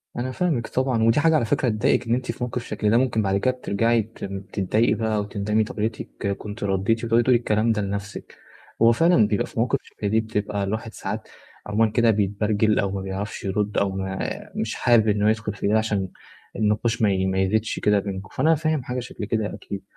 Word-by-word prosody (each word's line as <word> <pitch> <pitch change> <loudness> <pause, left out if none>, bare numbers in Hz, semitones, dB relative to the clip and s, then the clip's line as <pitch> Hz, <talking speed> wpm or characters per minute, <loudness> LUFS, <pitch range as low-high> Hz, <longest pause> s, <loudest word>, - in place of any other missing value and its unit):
أنا 125 +2 -2
فاهمِك 150 -8 -1
طبعًا، 130 -3 0
ودي 115 +4 +4
حاجة 160 +1 +4
على 135 -7 +2
فكرة 135 +1 +1
تضايقِك 115 +2 +1
إن 115 - +2
أنتِ 130 0 -2
في - - -6
موقف 125 0 -3
شكل 105 - -1
ده، 115 - +4
ممكن 120 -4 +2
بعد 100 -1 +1
كده 130 +6 +2
بترجَعي 115 -1 +1
ت 110 +2 -12 0.3
تتضايقي 105 +4 +2
بقى 110 -1 0
وتندمي 105 +1 0
طب - - -8
يا - - 0
ريتِك 110 -2 -3
كنتِ 105 +1 -7
رديتِ 100 +4 0
وتقعدي 115 +1 +3
تقولي 125 0 +4
الكلام 110 0 +1
ده 105 - 0
لنفْسِك. 100 +1 -5 0.5
هو 115 +1 +7
فعلًا 140 -5 +4
بيبقى 105 - 0
فيه - - -16
مواقف 125 +3 +1
شَبه 105 - -6
دي 110 +2 +3
بتبقى 105 -2 -2
الواحد 110 +3 -3
ساعات - - -5 0.4
عمومًا 105 +1 +2
كده 120 -1 +4
بيتبرجل 105 +1 +1
أو 100 -2 0
ما 100 - -3
بيعرفش 95 +2 -5
يرُد 105 +1 -1
أو 100 - +2
ما 95 0 -4 0.4
مش 110 - -2
حابب 120 -3 +4
إن 105 -1 +2
هو 105 - +4
يدخُل 105 -1 0
في 100 - -3
ده 110 +2 +3
عشان 105 -4 -1 0.5
النقاش 110 +2 0
ما 105 -2 +4
ي 95 0 0
ما 95 0 0
يزيدش 110 +4 0
كده 105 -1 +3
بينكم، 95 -1 -6
فأنا 160 +1 +4
فاهم 155 -2 -1
حاجة 125 +1 -3
شكل 120 -3 -6
كده 110 0 -1
أكيد. 100 -1 -7
110 Hz, 215 wpm, -24 LUFS, 100-115 Hz, 0.5 s, هو